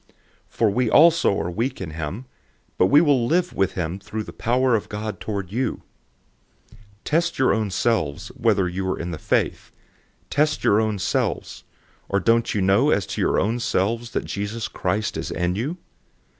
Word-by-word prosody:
For 115 Hz, -, +1 dB
we 125 Hz, +2 st, +1 dB
also 165 Hz, -6 st, +5 dB
are 85 Hz, +2 st, -3 dB
weak 120 Hz, +8 st, -2 dB
in 90 Hz, -5 st, -5 dB
him, 80 Hz, -, -5 dB, 0.5 s
but 90 Hz, -, +5 dB
we 145 Hz, +7 st, +6 dB
will 140 Hz, -7 st, +3 dB
live 175 Hz, +4 st, +1 dB
with 95 Hz, -, 0 dB
him 90 Hz, +1 st, -3 dB
through 110 Hz, +2 st, -5 dB
the -, -, -10 dB
power 125 Hz, +2 st, +1 dB
of 105 Hz, -, -3 dB
God 105 Hz, +1 st, -5 dB
toward 100 Hz, -4 st, -4 dB
you. 125 Hz, +2 st, -2 dB, 0.9 s
013:005 -, -, -18 dB, 0.3 s
Test 165 Hz, +3 st, 0 dB
your 130 Hz, -, +3 dB
own 105 Hz, 0 st, 0 dB
selves, 95 Hz, -8 st, -1 dB
whether 105 Hz, -5 st, +1 dB
you 95 Hz, +1 st, -3 dB
are -, -, -1 dB
in 85 Hz, +1 st, -4 dB
the 80 Hz, -, -6 dB
faith. -, -, -1 dB, 0.6 s
Test 150 Hz, +1 st, +1 dB
your 105 Hz, +2 st, +4 dB
own 110 Hz, -2 st, -1 dB
selves. 95 Hz, -, -2 dB, 0.4 s
Or 100 Hz, -, +2 dB
don't 115 Hz, +4 st, +2 dB
you 105 Hz, -, +1 dB
know 100 Hz, +10 st, +4 dB
as 100 Hz, -8 st, +2 dB
to -, -, -4 dB
your -, -, +2 dB
own 115 Hz, +5 st, 0 dB
selves, 115 Hz, +2 st, -1 dB
that -, -, -2 dB
Jesus 105 Hz, +3 st, -4 dB
Christ 100 Hz, 0 st, -2 dB
is 80 Hz, -, -4 dB
in 90 Hz, 0 st, -1 dB
you? 130 Hz, -, -3 dB
110 Hz, 185 wpm, -23 LUFS, 95-120 Hz, 0.9 s, we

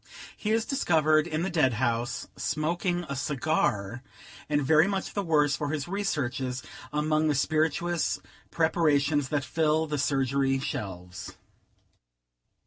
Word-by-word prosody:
He 210 Hz, -, -4 dB
is 225 Hz, +1 st, +2 dB
discovered 155 Hz, -, +2 dB
in 160 Hz, 0 st, -2 dB
the 190 Hz, -, -1 dB
dead 150 Hz, -7 st, +3 dB
house, 120 Hz, +1 st, -1 dB
smoking 175 Hz, +4 st, -1 dB
a 140 Hz, -, -4 dB
cigar, 125 Hz, -6 st, -1 dB, 0.5 s
and 145 Hz, -1 st, +2 dB
very 155 Hz, +5 st, +5 dB
much 195 Hz, -1 st, -2 dB
the 200 Hz, -, 0 dB
worse 150 Hz, -5 st, +2 dB
for 145 Hz, -, -3 dB
his 145 Hz, -2 st, -2 dB
researches 135 Hz, -10 st, -2 dB, 0.3 s
among 155 Hz, +1 st, +1 dB
the 150 Hz, -, +2 dB
spirituous 160 Hz, +4 st, 0 dB, 0.3 s
preparations 150 Hz, -4 st, +2 dB
that 145 Hz, -3 st, -1 dB
fill 160 Hz, 0 st, +1 dB
the 150 Hz, -2 st, -3 dB
surgery 135 Hz, -1 st, +1 dB
shelves. 90 Hz, -, -6 dB
150 Hz, 130 wpm, -28 LUFS, 135-160 Hz, 0.5 s, very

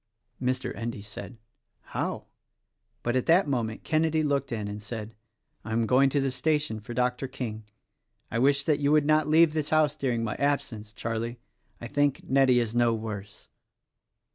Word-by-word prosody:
Mr. 130 Hz, 0 st, -1 dB
Endy 115 Hz, -2 st, -5 dB
said, 110 Hz, +3 st, -8 dB, 0.4 s
"How?" -, -, -4 dB, 0.8 s
but 120 Hz, +1 st, 0 dB
at 130 Hz, -, 0 dB
that 170 Hz, +1 st, +5 dB
moment 115 Hz, -5 st, -2 dB
Kenedy 160 Hz, 0 st, +1 dB
looked 140 Hz, -3 st, 0 dB
in 110 Hz, -3 st, -3 dB
and 105 Hz, +1 st, -6 dB
said, 110 Hz, 0 st, -6 dB, 0.5 s
"I 110 Hz, -, -5 dB
am 115 Hz, 0 st, +2 dB
going 130 Hz, +4 st, +4 dB
to 140 Hz, -, +1 dB
the 135 Hz, -1 st, 0 dB
station 150 Hz, -4 st, 0 dB
for 115 Hz, +3 st, -8 dB
Dr. 125 Hz, +1 st, 0 dB
King. 115 Hz, -5 st, -6 dB, 0.7 s
I 115 Hz, -, 0 dB
wish 140 Hz, +2 st, +3 dB
that 150 Hz, 0 st, +1 dB
you 145 Hz, 0 st, +2 dB
would 150 Hz, -1 st, +4 dB
not 155 Hz, 0 st, +3 dB
leave 160 Hz, 0 st, +5 dB
the 155 Hz, -, +1 dB
house 150 Hz, 0 st, +2 dB
during 125 Hz, -6 st, -1 dB
my 110 Hz, -, -1 dB
absence, 120 Hz, -7 st, -1 dB
Charlie. 115 Hz, +2 st, -3 dB, 0.4 s
I -, -, -7 dB
think 145 Hz, +3 st, 0 dB
Nettie 130 Hz, -2 st, +4 dB
is 115 Hz, -2 st, -1 dB
no 120 Hz, -1 st, +3 dB
worse." 105 Hz, -2 st, -7 dB
125 Hz, 170 wpm, -27 LUFS, 115-145 Hz, 0.8 s, that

